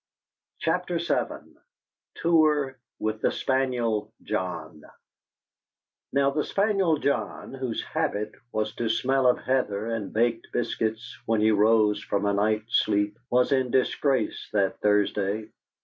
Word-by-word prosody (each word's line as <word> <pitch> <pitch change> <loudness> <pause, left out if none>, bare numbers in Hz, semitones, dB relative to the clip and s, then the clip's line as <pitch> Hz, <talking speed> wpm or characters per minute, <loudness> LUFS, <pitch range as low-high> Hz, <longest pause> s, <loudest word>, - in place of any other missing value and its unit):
CHAPTER 175 +1 0
VII 170 +1 -3 0.6
TOUR 150 -5 +2 0.2
WITH 110 0 -2
THE - - +2
SPANIEL 125 -5 0
JOHN - - -4 1.3
Now 140 0 +3
the 150 +1 0
spaniel 195 -5 +2
John 140 -1 -2
whose 130 -4 -3
habit 105 +1 -2 0.2
was 110 -1 -1
to 115 -1 -1
smell 130 +3 +2
of 125 - +4
heather 110 -6 -1
and 110 -4 -3
baked 115 +1 0
biscuits 110 -1 -2
when 115 -1 +2
he 110 +1 +4
rose 105 0 +3
from 100 0 -1
a 100 - +2
night's 110 +2 +1
sleep 105 0 0
was 125 +2 +3
in 130 -2 +2
disgrace 130 -1 0
that 100 -2 +1
Thursday. 105 +1 +1
115 Hz, 125 wpm, -26 LUFS, 105-135 Hz, 1.3 s, of